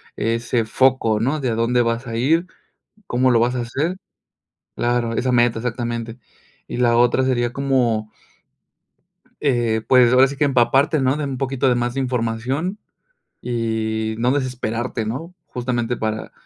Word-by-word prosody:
ese 115 +1 -1
foco, 115 -2 +2
¿no?, 135 +7 0
de 130 -4 -1
a 110 - -1
dónde 120 +2 +2
vas 115 +2 -1
a 115 - -4
ir, 165 +8 +2 0.6
cómo 130 +1 +2
lo 115 - +4
vas 120 +2 +1
a - - -1
hacer. 150 +10 -2 0.8
Claro, 120 -1 0
esa 130 +1 0
meta, 120 -2 +3
exactamente. 120 0 -4 0.5
Y - - -5
la 120 -1 +3
otra 120 +2 +3
sería 120 -2 0
como 125 -6 0 1.3
eh, 120 -5 +1
pues, 125 -2 +5
ahora 130 +1 +6
sí 140 0 -7
que 150 - +1
empaparte, 135 +3 +3
¿no?, 130 +2 +1
de 150 - -3
un 135 -2 -4
poquito 135 0 0
de 125 - +4
más 120 +1 -1
de - - -1
información 125 - -2 0.7
y 110 -2 -2
no 125 +2 +1
desesperarte, 120 -4 -2
¿no?, 165 +11 -5
justamente 120 -1 -2
para, 110 0 -3
120 Hz, 155 wpm, -21 LUFS, 115-130 Hz, 1.3 s, ahora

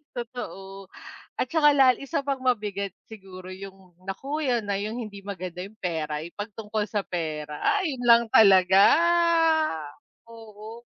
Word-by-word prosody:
totoo. 195 -6 -8 0.5
At 255 - -2
saka 295 -3 +4
lal 260 -3 +5
isa 280 +1 -3
pang 275 -1 -2
mabigat 205 -5 -1 0.2
siguro 190 -3 -11
yung 190 -2 -12
naku 275 +11 -4
'yan 240 -3 +1
na 200 - 0
'yung 215 +4 -4
hindi 210 -3 -8
maganda 185 -2 -6
'yung 205 +3 -13
pera, 155 -3 -3
'yung 170 - -11
'pag 210 +1 -6
tungkol 215 0 -3
sa 205 0 -2
pera, 155 -4 -5 0.2
ay 305 -8 -2
'yun 245 - -8
lang 235 0 +7
talaga, 190 -2 +6 1.5
oo. 225 +1 -12
205 Hz, 145 wpm, -25 LUFS, 185-240 Hz, 1.5 s, lang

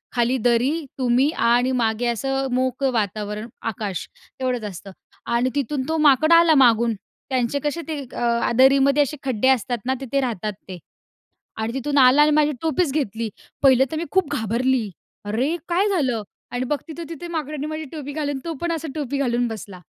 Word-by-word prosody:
खाली 240 +2 +2
दरी, 240 +3 +3 0.3
तुम्ही 255 +2 +3 0.2
आणि 245 +2 +3
मागे 225 +1 0
असं 270 +3 -1
मोकळं 260 +1 0
वातावरण, 210 -1 -2
आकाश 205 -4 -4 0.3
तेवढंच 250 -3 -1
असतं 195 +1 -10 0.4
आणि 240 +2 +2
तिथून 280 -1 -1
तो 320 - +1
माकड 305 +1 +5
आला 335 -1 +6
मागून. 235 -3 +4 0.4
त्यांचे 260 +1 0
कसे 295 +3 -2
ते 310 -3 -3 0.2
अ, 235 -1 +1
दरीमध्ये 275 +2 +5
असे 295 +2 -5
खड्डे 260 -3 0
असतात 250 -1 +1
ना, 260 - +1
तिथे 275 +1 -1
राहतात 215 -5 -2
ते 185 -1 -7 0.8
आणि 220 +1 -3
तिथून 285 +2 0
आला 260 +2 +7
आणि 300 - +5
माझी 300 0 +2
टोपीच 325 -1 +1
घेतली. 230 -6 -2 0.3
पाहिलं 265 -2 +6
तर - - -2
मी 325 - -2
खूप 375 -5 +1
घाबरली. 235 0 0 0.3
"अरे! 250 +11 0
काय 365 +4 +2
झालं?" 260 - 0 0.3
आणि 245 +1 -1
बघते 295 +2 -3
तर 340 - -4
तिथे 335 +1 -7
माकडाने 305 -3 -4
माझी 310 0 -4
टोपी 290 -3 -6
घालून 290 -2 -2
तो 335 - -3
पण, 345 0 -1
असा 325 -1 -4
टोपी 285 -3 -3
घालून 245 -3 +1
बसला 200 -4 -8
260 Hz, 175 wpm, -22 LUFS, 235-295 Hz, 0.8 s, आला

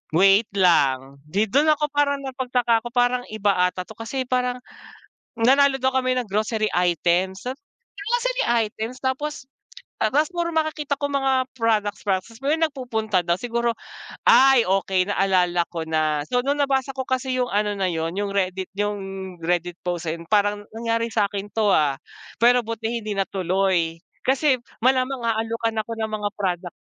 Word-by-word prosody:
wait 195 +5 +5
lang 140 -8 +3
‘di 200 +7 0
dun 285 +9 +2
ako 300 0 +1
parang 285 -1 +1
napagtaka 250 -3 0
ko. 240 - -5
Parang 245 0 +2
iba 205 -2 +1
ata 180 0 -5
‘to 220 - -12
kasi 245 +3 -4
parang, 250 0 0 0.8
nanalo 270 +4 +4
daw 260 0 +1
kami 255 -1 +1
ng 245 - -1
grocery 215 +1 0
items 180 +2 +1
sa 255 - -1 0.6
grocery - - 0 0.2
items? 225 +4 -6
Tapos 265 +2 -3 0.6
tapos 300 +10 +2
puro 345 -1 -1
makakita 310 -3 -1
kong 285 0 -2
mga 270 0 +1 0.2
products 210 -3 0
products 205 +4 -2
pero 295 +3 +2
nagpupunta 245 - -1
daw 170 0 +1
siguro, 235 +2 -1 0.6
ay 265 -3 +7
okey 190 0 +1
naalala 180 -3 +2
ko 165 -1 -3
na. 155 -2 +1
So 245 - +1
nung 285 +1 0
nabasa 270 -1 +1
ko 260 - -2
kasi 260 0 -1
yung 250 -1 0
ano 210 0 +1
na 190 -2 0
yun, 165 -1 -2
yung 205 0 -1
Reddit 190 -1 -1
yung 205 0 -1 0.4
Reddit 175 +1 -1
post 175 -2 -3
ayun, 165 +1 -4
parang 205 0 +1
nangyari 230 0 -1
sa'kin 205 -1 -1
‘to, 215 -2 +2
ah. 145 -3 +2 0.4
Pero 245 +1 +5
buti 230 +1 -3
hindi 210 0 -4
natuloy. 185 -3 0 0.2
Kasi 275 +1 +3 0.3
malamang 260 +1 +2
aalukan 225 0 -1
ako 230 +2 -8
ng 220 - 0
mga 210 -1 -2
product. 180 -3 -3
220 Hz, 160 wpm, -23 LUFS, 190-260 Hz, 0.8 s, ay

